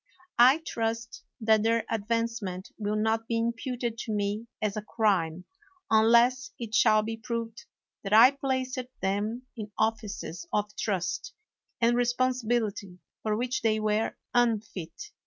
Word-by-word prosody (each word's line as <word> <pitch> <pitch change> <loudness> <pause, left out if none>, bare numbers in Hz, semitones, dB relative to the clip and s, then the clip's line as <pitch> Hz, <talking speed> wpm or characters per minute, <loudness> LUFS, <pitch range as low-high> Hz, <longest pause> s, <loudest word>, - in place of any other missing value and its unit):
I 265 +7 +7
trust 230 0 -3 0.2
that 220 -1 +4
their 230 +1 +1
advance 230 +1 -1
ment 185 -1 -6
will 210 0 -1
not 220 +1 0
be 230 - 0
imputed 235 0 -2
to 225 - -4
me 210 +2 -2
as 210 -2 -1
a 215 - -2
crime 190 -6 0 0.5
unless 235 +4 +4
it 230 -2 -7
shall 215 0 +5
be 225 +1 -4
proved 230 0 -5 0.4
that 195 - -5
I 230 +5 +9
placed 260 -2 -2 0.2
them 210 +5 -1
in 215 -3 -7
offices 220 - -2
of 210 0 -1
trust 190 - -2 0.4
and 235 0 +3
responsibility 240 -6 0 0.2
for 215 -1 0
which 250 +2 -1
they 220 -1 +2
were 215 +1 0 0.2
unfit. 225 - -1
225 Hz, 140 wpm, -28 LUFS, 210-235 Hz, 0.5 s, I